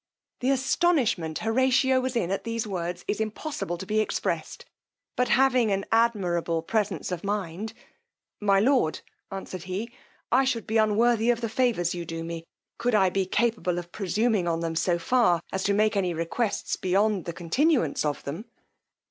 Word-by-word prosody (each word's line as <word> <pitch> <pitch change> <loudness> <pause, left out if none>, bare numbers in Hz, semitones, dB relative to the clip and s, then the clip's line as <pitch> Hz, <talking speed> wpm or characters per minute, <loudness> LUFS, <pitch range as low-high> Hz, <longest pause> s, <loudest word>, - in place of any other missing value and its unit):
The 255 - 0
astonishment 265 - +1
Horatio 260 +3 +3
was 255 0 -2
in 190 -6 0
at 195 - -2
these 230 -1 -2
words 180 -3 -4
is 210 - -1
impossible 215 - -3
to 190 - -7
be 215 +2 0
expressed; 215 - -2 0.5
but 250 - +1
having 255 -3 +4
an 195 0 0
admirable 180 -8 +1
presence 210 -1 -1
of 175 -2 -4
mind, 200 +1 -3 0.7
my 200 -2 +3
lord, 245 - +2 0.3
answered 190 -2 -7
he, 195 +6 -4 0.4
I 260 +3 +5
should 245 -4 -1
be 220 - 0
unworthy 225 +2 +3
of 240 -1 +2
the 230 - -2
favours 220 -7 +1
you 175 -1 -4
do 165 0 -5
me, 165 0 -6 0.3
could 240 -1 +1
I 190 -3 +4
be 190 -1 0
capable 210 -4 0
of 175 0 -6
presuming 210 0 0
on 165 -1 0
them 165 -1 -2
so 170 +1 +1
far 180 -2 +3
as 190 - -1
to 200 - +2
make 215 +1 +2
any 180 -4 0
requests 185 +7 -1
beyond 195 +1 +1
the 170 - -4
continuance 175 - +1
of 150 -1 -2
them. 160 +11 -6
210 Hz, 170 wpm, -26 LUFS, 175-235 Hz, 0.7 s, I